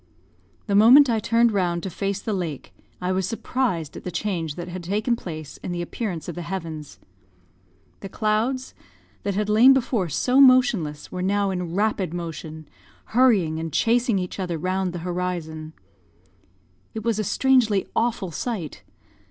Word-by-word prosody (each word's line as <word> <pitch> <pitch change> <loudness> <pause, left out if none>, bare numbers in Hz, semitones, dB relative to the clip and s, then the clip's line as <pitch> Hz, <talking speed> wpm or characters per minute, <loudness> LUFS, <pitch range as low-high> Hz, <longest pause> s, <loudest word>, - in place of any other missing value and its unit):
The 200 - -2
moment 245 +6 +7
I 225 - +1
turned 230 +2 +3
round 175 -4 0
to 190 - -4
face 195 +2 -2
the 215 - -3
lake, 170 -7 -4 0.3
I 180 0 -1
was 185 -1 0
surprised 225 - -2
at - - -8
the - - -4
change 170 -4 -3
that 175 0 -6
had 180 +1 -6
taken 215 +7 0
place 155 -8 -8
in - - -6
the 175 - -3
appearance 180 -3 -5
of 175 - -4
the 175 - -6
heavens. 165 -4 -6 1.0
The 195 - -8
clouds, 225 +6 -1 0.5
that 200 -1 -2
had 210 +1 0
before 235 +1 +4
lain - - -6
so 255 - +3
motionless, 240 - +3
were 180 - -4
now 200 +1 +1
in 180 -2 -4
rapid 195 -4 0
motion, 160 -2 -7 0.5
hurrying 205 -11 +3
and 165 0 -4
chasing 235 +1 +2
each 180 +1 -4
other 175 -3 -2
round 185 +2 -1
the 175 -1 -7
horizon. 170 -3 -4 1.2
It 220 - -4
was 230 -2 0
a - - +1
strangely 230 -3 +2
awful 225 -6 0
sight. 190 -4 -4
190 Hz, 160 wpm, -24 LUFS, 170-225 Hz, 1.2 s, moment